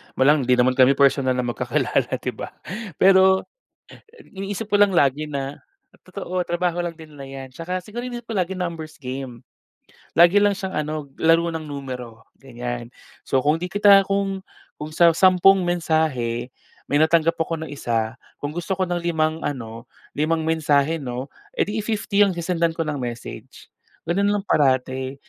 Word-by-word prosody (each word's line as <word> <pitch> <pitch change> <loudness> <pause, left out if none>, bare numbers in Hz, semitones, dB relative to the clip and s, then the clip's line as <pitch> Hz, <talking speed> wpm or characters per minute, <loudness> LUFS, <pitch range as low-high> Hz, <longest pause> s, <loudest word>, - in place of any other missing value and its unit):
walang 140 -1 +3
hindi 125 - +5
naman 125 +1 +2
kami 130 +2 +6
personal 135 -2 +3
na 125 - -1
magkakilala, 120 -1 0
'di - - -4
ba? - - -9 0.4
Pero, 190 +1 +5 0.8
iniisip 195 +2 -5
ko 205 - +5
lang 195 -3 +4
lagi 145 +2 +2
na 140 0 -5 0.4
totoo, 185 0 -4
trabaho 175 0 -1
lang 170 -2 -5
din 160 -2 -13
na 140 -2 -9
'yan 135 -1 -9
tsaka 180 +5 -5
siguro 230 +3 -6
iniisip 240 -1 -7
ko 230 - -6
lagi 185 +1 -4
numbers 165 -3 -5
game. 130 -2 -7 0.7
Lagi 175 +4 +7
lang 205 - +4
siyang 190 -1 -4
ano, 150 -1 -3 0.2
laro 165 +1 +4
ng 160 - -4
numero, 125 -6 -8
ganyan. 120 -2 -6 0.3
So 135 - +1
kung 150 +5 +1
'di 180 - -4
kita 200 -1 +6
kung 195 0 -2 0.3
kung 150 +1 -7
sa 170 +1 +4
sampung 185 +1 +5
mensahe, 155 -9 -1 0.4
may 145 - +3
natanggap 165 +1 +3
ako 165 0 -2
na - - -7
isa, 115 -4 -2 0.2
kung 145 - -5
gusto 175 +4 -3
ko 190 - 0
ng 175 -1 -1
limang 160 -2 0
ano, 115 -5 -5 0.3
limang 160 +2 0
mensahe 155 -1 +2
'no, 130 -1 -5 0.3
edi 210 +2 -1
i - - -1
50 210 -2 -1
ang 200 - +2
sesendan 170 -1 0
ko 165 - -1
ng 150 -2 -2
message. 120 0 -7 0.4
Gano'n 195 +4 +1
lang 205 - -2
parati, 130 -5 +1
160 Hz, 165 wpm, -22 LUFS, 135-180 Hz, 0.8 s, Lagi